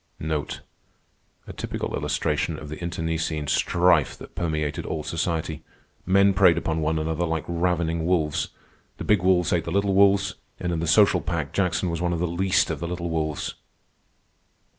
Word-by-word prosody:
A - - -7
typical - - -4
illustration 80 - -1
of 75 - -9
the 75 +4 -7
internecine 80 -2 -2
strife 85 +1 +2
that - - -12
permeated 75 -4 -2
all 80 -1 -4
society. 80 0 -2 0.5
Men 100 +1 +5
preyed 90 -3 +5
upon 80 -1 -1
one 80 +1 0
another 80 +2 -1
like 80 -3 -1
ravening 85 -1 0
wolves. 80 -5 +1 0.5
The - - -5
big 105 -4 +3
wolves 90 -1 +3
ate 85 -2 +1
the 85 - -4
little 100 +1 +1
wolves, 100 -1 +4 0.3
and 90 -1 -2
in 80 - -1
the 85 - -2
social 95 0 +5
pack 80 -3 -3
Jackson 90 -2 0
was 85 0 -3
one 90 0 0
of 85 - -2
the 90 - +1
least 90 +3 +1
of - - -4
the 85 - -3
little 85 -1 -4
wolves. 80 -2 -2
85 Hz, 165 wpm, -25 LUFS, 80-90 Hz, 0.5 s, Men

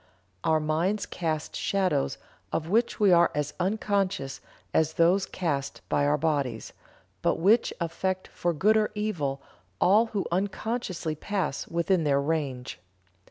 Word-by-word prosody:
Our 160 -1 +3
minds 165 +7 0
cast 160 -3 -3
shadows 185 - 0 0.3
of 160 - -2
which 225 +6 +1
we 205 -3 +5
are 170 -1 +6
as 150 0 -1
unconscious 195 -6 -1 0.3
as 160 -1 +2
those 180 +4 +3
cast 145 -7 -3
by 145 - +2
our 150 +1 +3
bodies, 145 -4 -1 0.5
but - - +2
which 210 +8 +4
affect 185 +2 -2
for 175 - -1
good 205 +8 +3
or 215 -1 +2
evil 155 -11 -2 0.4
all 210 +5 +5
who 205 -3 -2
unconsciously 190 -2 -2
pass 185 -1 -3
within 170 +1 +1
their 140 -2 +3
range. 140 - -2
170 Hz, 135 wpm, -27 LUFS, 150-200 Hz, 0.5 s, are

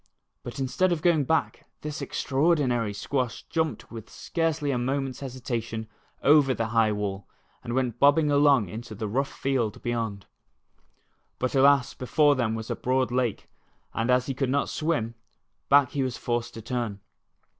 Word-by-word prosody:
But 120 +3 -8
instead 135 +8 +1
of 160 -3 -1
going 160 -5 +3
back, 160 +4 -1
this 150 -1 -5
extraordinaiy* 135 -7 +1
squash 125 +2 -2
jumped 160 -1 -2
with 115 -2 -9
scarcely 160 -4 -1
a 125 - 0
moments 135 +1 -2
hesitation 120 -4 -4 0.4
over 140 -3 +5
the 115 0 -2
high 110 -1 +3
wall, 100 -2 -3 0.4
and 120 - -3
went 125 -3 -1
bobbing 145 +2 +5
along 140 -6 +4
into 110 +4 -7
the 110 +1 -4
rough 135 +7 0
tield 125 -6 0
bevond. 115 -5 -3 1.1
But 130 - -1
alas, 140 -1 +4
before 145 +3 +3
them 115 -4 0
was 110 0 -5
a - - 0
broad 130 0 0
lake, 125 -4 -1 0.5
and 115 +2 -1
as 125 0 +3
he 135 - -2
could 135 0 -1
not 140 +2 +1
swim, 150 -8 -1 0.6
back 140 -2 +5
he 140 - -1
was 130 -2 -2
forced 120 0 -2
to 115 - -8
turn. 115 -4 -3
130 Hz, 160 wpm, -26 LUFS, 115-140 Hz, 1.1 s, over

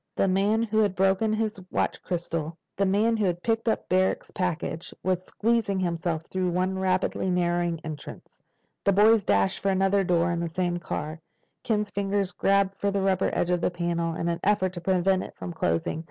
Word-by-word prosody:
The - - +2
man 200 +4 +2
who 220 -1 0
had 205 -3 +2
broken 195 +3 +2
his 215 -1 -1
watch - - -1
crystal—the 170 +2 -3
man 215 +4 +2
who 215 - +1
had 175 -1 -1
picked 225 0 +1
up - - -1
Barrack's 185 +1 +1
package—was 180 +1 -2
squeezing 220 -2 0
himself 170 -2 -1
through 185 -1 -1
one 185 +2 0
rapidly 185 0 0
narrowing 175 -2 0
entrance. 155 -2 -8 0.6
The 200 - +3
boys 215 +2 +5
dashed 100 - +2
for 200 - 0
another 195 +1 +2
door 175 -1 +2
in 170 - -1
the 170 - -1
same 175 +1 -1
car. 155 -1 -5 0.4
Ken's 210 -2 0
fingers 200 -1 -1
grabbed 195 0 +1
for 200 - +1
the 200 0 0
rubber 190 -1 +2
edge 175 - 0
of 175 -1 +1
the - - +2
panel 170 -1 -2
in 170 - -2
an 170 0 -1
effort 190 -2 +2
to 175 - -7
prevent 185 +1 +2
it - - -9
from 175 - -6
closing. 85 - -1
185 Hz, 185 wpm, -26 LUFS, 170-200 Hz, 0.6 s, boys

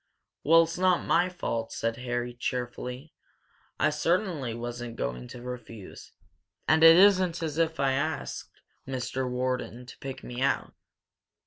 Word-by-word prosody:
"'Well, 165 +3 +7
it's 165 +1 -5
not 185 -1 +3
my 175 +2 +3
fault," 115 -10 -3
said 115 0 -2
Harry, 120 0 -3
cheerfully. 125 +3 -4 0.7
"I - - +3
certainly 155 - 0
wasn't 120 0 -6
going 60 - -4
to 120 - -10
refuse. 120 -5 -9 0.6
And 160 0 +4
it 165 0 +10
isn't 185 -3 +5
as 160 0 -3
if 160 -2 +1
I'd 135 -1 +2
asked 155 +3 -4 0.2
Mr. 130 0 -2
Wharton 125 -1 -2
to 125 - -12
pick 135 -1 -7
me 125 +1 -6
out." 140 - 0
130 Hz, 140 wpm, -28 LUFS, 120-165 Hz, 0.7 s, it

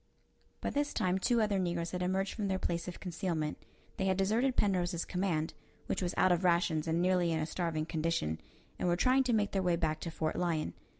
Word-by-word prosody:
By - - -1
this 290 0 -1
time 185 +1 +1
two 235 +3 +2
other 205 -2 +1
negroes 170 -2 -1
had 180 - -3
emerged 190 +2 0
from 210 -3 -2
their 190 -1 0
place 170 -2 -2
of 180 - -6
concealment. 170 -4 -2 0.4
They 190 - 0
had 190 -1 +2
deserted 225 +7 +2
Penrose's 180 -4 +1
command 175 -4 -1 0.3
which - - -2
was 175 -1 -1
out 185 - +5
of 175 +1 +2
rations 170 -3 +2
and 165 +2 +1
nearly 180 -2 +3
in 160 - +1
a 155 - 0
starving 165 -2 -2
condition 160 - -1 0.4
and - - 0
were 175 - +3
trying 255 +8 +4
to 245 - +2
make 210 -2 +2
their 195 - +1
way 180 -2 +2
back 160 -2 -1
to 170 - -4
Fort 155 -1 -2
Lyon. 170 -3 0
180 Hz, 220 wpm, -32 LUFS, 165-195 Hz, 0.4 s, out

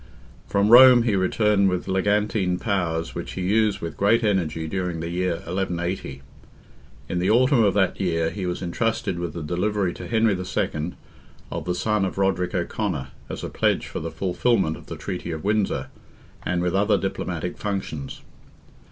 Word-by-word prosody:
From 100 +1 +2
Rome 125 0 +9
he 115 -4 +1
returned 100 +1 +2
with 90 -1 -2
legantine 100 -1 +1
powers 85 -6 -1
which - - -6
he 95 - -4
used 105 +1 +2
with 85 -2 -5
great 115 +4 +3
energy 80 -6 0
during 90 -1 -2
the 85 +1 -4
year 90 0 0
1180. 85 -5 -3 0.8
In 90 - -2
the 90 - +1
autumn 125 +1 +4
of 100 -2 +2
that 95 -1 +1
year, 85 -3 0
he 95 -3 -4
was 90 +1 -3
entrusted 110 0 -1
with 85 -3 -4
the 85 - -5
delivery 90 +3 0
to - - -8
Henry 110 -2 +2
II. 90 -2 -2 0.6
of - - -4
the 90 - -1
son 105 +2 0
of 95 - -3
Roderick 95 -2 0
O'Conor, 90 -4 -2 0.2
as - - -6
a - - -3
pledge - - +1
for - - -5
the 85 - -4
fulfilment 90 +1 0
of - - -14
the 85 - -6
treaty 90 +2 -5
of 80 -2 -5
Windsor, 105 0 0 0.5
and 90 -1 -1
with 90 -1 0
other 100 +1 +3
diplomatic 90 -3 -3
functions. 95 -9 -4
95 Hz, 170 wpm, -24 LUFS, 85-105 Hz, 0.8 s, Rome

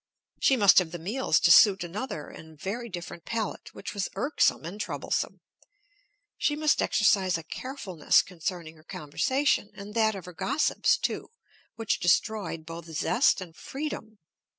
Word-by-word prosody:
She 265 - +4
must 200 -5 +7
have 180 -3 -2
the 175 - -5
meals 200 +2 +1
to 170 - +5
suit 200 +1 +7
another 175 - -5
and 160 -2 -13
very 230 +7 -4
different 175 -2 -7
palate, 225 +3 -4
which - - -7
was 200 -2 -2
irksome 280 - +1
and 195 +6 -6
troublesome. - - -3 1.0
She 295 - +1
must 305 0 +2
exercise 195 -4 +3
a 165 - -8
carefulness 190 - 0
concerning 170 -2 -6
her 155 - -19
conversation, 210 - 0
and 200 +1 -9
that 220 -2 +2
of 190 - -8
her 180 - -10
gossips, 275 - +1
too, - - -3 0.5
which 225 -1 -1
destroyed 175 -3 0
both 165 0 -8
zest 170 - +2
and 170 -3 -9
freedom. 265 -7 -6
195 Hz, 150 wpm, -27 LUFS, 170-230 Hz, 1.0 s, must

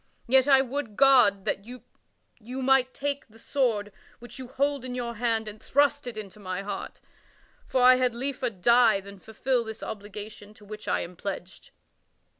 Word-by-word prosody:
Yet 260 +2 +4
I 270 -2 +6
would 265 -4 -4
God 250 -8 +5
that 200 - -1
you 250 +1 -10 0.8
might 260 -1 +3
take 280 +1 -3
the 220 - -19
sword 225 -5 -1 0.3
which 240 +2 -11
you 260 - -7
hold 280 +1 -1
in 250 -1 -5
your 240 -1 -3
hand 225 -1 -1
and 210 0 -9
thrust 285 -1 +1
it 215 -5 -7
through 210 - -16
my 185 0 -4
heart; 200 -1 -6 0.7
for 255 - +1
I 255 0 +8
had 250 -2 +1
liefer 260 0 -2
die 230 +1 +4
than 200 0 -12
fulfil 240 +4 -1
this 220 0 -8
obligation 210 0 -8
to 210 - -17
which 215 +1 -9
I - - +1
am 180 +1 -7
pledged." 185 0 -7
235 Hz, 175 wpm, -27 LUFS, 210-260 Hz, 0.8 s, I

